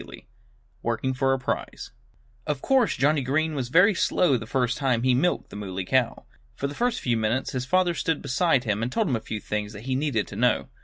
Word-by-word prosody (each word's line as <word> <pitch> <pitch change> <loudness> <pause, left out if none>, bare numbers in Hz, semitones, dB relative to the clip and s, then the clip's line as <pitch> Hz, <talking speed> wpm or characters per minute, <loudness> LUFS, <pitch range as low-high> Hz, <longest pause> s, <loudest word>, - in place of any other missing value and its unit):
III - - -13 0.6
WORKING 120 +3 -1
FOR 135 +1 +1
A 135 - +2
PRIZE 130 - -4 0.6
Of 150 -3 -1
course 265 -4 +2
Johnnie 145 +3 +2
Green 155 +5 0
was 130 -4 -3
very 180 - +5
slow 175 -4 +2
the 115 -2 -4
first 125 0 0
time 130 -4 +1
he 130 -1 +3
milked 150 +8 0
the - - -9
Muley 95 -2 -5
Cow. 130 +2 0 0.3
For - - -4
a 235 - 0
few 125 - -1
minutes 110 +4 -1
his 125 -1 -3
father 185 +1 +2
stood 165 -2 -1
beside 140 -1 +2
him 105 -3 -1
and 120 +2 -2
told 220 - 0
him 130 - +1
a - - -1
few 110 - -5
things 105 0 -4
that 105 +1 -9
he 130 +1 -2
needed 135 -6 0
to - - -8
know. - - +1
130 Hz, 220 wpm, -25 LUFS, 115-155 Hz, 0.6 s, very